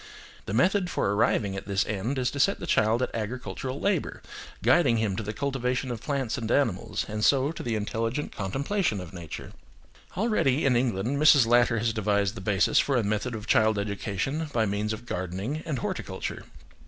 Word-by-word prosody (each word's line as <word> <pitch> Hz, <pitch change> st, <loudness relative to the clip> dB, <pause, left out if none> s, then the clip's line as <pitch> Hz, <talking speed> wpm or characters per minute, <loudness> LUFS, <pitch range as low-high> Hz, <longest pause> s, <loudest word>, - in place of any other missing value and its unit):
The -, -, -3 dB
method 185 Hz, -, +3 dB
for 100 Hz, -, 0 dB
arriving 100 Hz, -1 st, +1 dB
at 95 Hz, -, -6 dB
this 100 Hz, -1 st, +1 dB
end 110 Hz, +6 st, -2 dB
is 125 Hz, -1 st, 0 dB
to 140 Hz, -, -5 dB
set 195 Hz, +9 st, +3 dB
the -, -, -5 dB
child 110 Hz, +3 st, +2 dB
at -, -, -3 dB
agricultural 120 Hz, +3 st, -4 dB
labour, 195 Hz, -6 st, -1 dB, 0.4 s
guiding 130 Hz, -9 st, +4 dB
him 110 Hz, -4 st, 0 dB
to -, -, -3 dB
the 105 Hz, 0 st, -4 dB
cultivation 130 Hz, +1 st, -2 dB
of 115 Hz, -2 st, -5 dB
plants 140 Hz, -4 st, -2 dB
and 110 Hz, -2 st, -4 dB
animals, 120 Hz, -8 st, 0 dB
and 105 Hz, 0 st, -3 dB
so 140 Hz, +3 st, +4 dB
to 165 Hz, -, -7 dB
the 115 Hz, -2 st, -2 dB
intelligent 115 Hz, +6 st, -2 dB
contemplation 135 Hz, -, -1 dB
of 90 Hz, -2 st, -9 dB
nature. 85 Hz, -4 st, -8 dB, 0.7 s
Already, 185 Hz, -, +2 dB
in 130 Hz, -3 st, +4 dB
England 120 Hz, +2 st, 0 dB
Mrs. 150 Hz, -4 st, +7 dB
Latter 120 Hz, 0 st, +4 dB
has 110 Hz, +1 st, 0 dB
devised 100 Hz, -2 st, +1 dB
the 105 Hz, -, -8 dB
basis 100 Hz, 0 st, +3 dB
for 135 Hz, -2 st, +2 dB
a 120 Hz, -, +1 dB
method 110 Hz, +4 st, -1 dB
of 105 Hz, -1 st, -7 dB
child 110 Hz, -2 st, +3 dB
education 100 Hz, -, -2 dB
by 115 Hz, -4 st, +1 dB
means 105 Hz, +1 st, -1 dB
of 110 Hz, +2 st, -6 dB
gardening 95 Hz, -, -3 dB
and 150 Hz, -5 st, -1 dB
horticulture. -, -, -4 dB
115 Hz, 190 wpm, -27 LUFS, 105-135 Hz, 0.7 s, Mrs